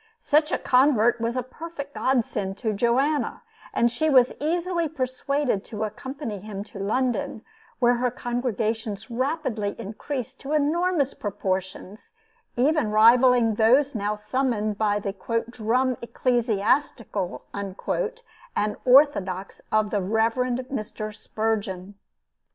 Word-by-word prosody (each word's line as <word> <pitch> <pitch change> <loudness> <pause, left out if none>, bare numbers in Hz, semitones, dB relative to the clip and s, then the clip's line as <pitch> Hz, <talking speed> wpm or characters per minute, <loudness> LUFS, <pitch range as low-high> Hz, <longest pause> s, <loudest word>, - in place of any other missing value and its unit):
Such 300 -6 +2
a - - +2
convert 250 -3 +3
was 230 +2 -1
a 255 - 0
perfect 285 +1 -8
godsend 220 -8 0
to 220 -2 -1
Joanna, 260 - +1 0.3
and 235 0 +2
she 315 +6 +1
was 255 -3 +5
easily 340 +2 0
persuaded 265 -4 -1
to 215 -1 -4
accompany 225 +1 -5
him 200 0 -6
to 200 - -7
London, 225 +2 -1 0.3
where 245 -1 +3
her 250 +1 +1
congregations 230 -3 -3
rapidly 255 -5 -1
increased 240 +4 -5
to 280 +2 -4
enormous 305 -1 +1
proportions, 190 - -4 0.4
even 270 -1 +2
rivaling 230 +2 +5
those 255 +7 +4
now 210 -2 -1
summoned 215 -2 -1
by 205 -1 +2
the 200 -1 -3 0.4
"drum 250 +3 +1
ecclesiastical" 230 -4 0
and 200 -2 -5 1.1
orthodox 225 -9 +3
of 215 -1 +2
the 205 - +1
Rev. 220 +4 +1
Mr. 245 -4 -3
Spurgeon. 205 -4 -3
235 Hz, 115 wpm, -25 LUFS, 210-265 Hz, 1.1 s, was